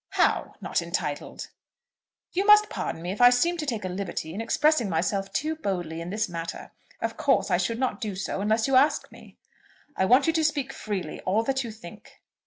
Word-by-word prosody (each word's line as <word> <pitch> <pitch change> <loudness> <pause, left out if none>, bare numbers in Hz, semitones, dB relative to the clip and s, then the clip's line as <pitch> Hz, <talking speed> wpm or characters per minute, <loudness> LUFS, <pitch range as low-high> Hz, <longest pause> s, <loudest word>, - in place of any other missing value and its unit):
"How - - +1
not - - -1
entitled?" - - -4 0.8
"You 380 - 0
must 420 0 +7
pardon 165 - -4
me 175 - -3
if 205 - -4
I 245 - +10
seem 335 +8 +2
to 305 -2 -4
take 225 -7 -2
a - - -1
liberty 180 -3 -4
in 205 - -4
expressing 255 0 +2
myself 195 +4 -1
too 310 +3 -1
boldly 175 - -3
in 170 - -6
this 210 +2 -1
matter. 165 -1 -6 0.3
Of - - -3
course - - +2
I - - +4
should 230 - -1
not 255 0 -2
do 210 -4 -3
so 195 +1 -3
unless 220 +2 +2
you 270 - +2
asked 280 +4 +3
me." - - -15 0.6
"I 190 - +2
want 250 +7 +5
you 325 - +2
to 320 -1 +1
speak 285 -3 0
freely, 205 -4 -5
all 205 +5 +1
that 265 +2 0
you 235 - -6
think." 215 -2 -13
220 Hz, 205 wpm, -26 LUFS, 190-270 Hz, 0.8 s, I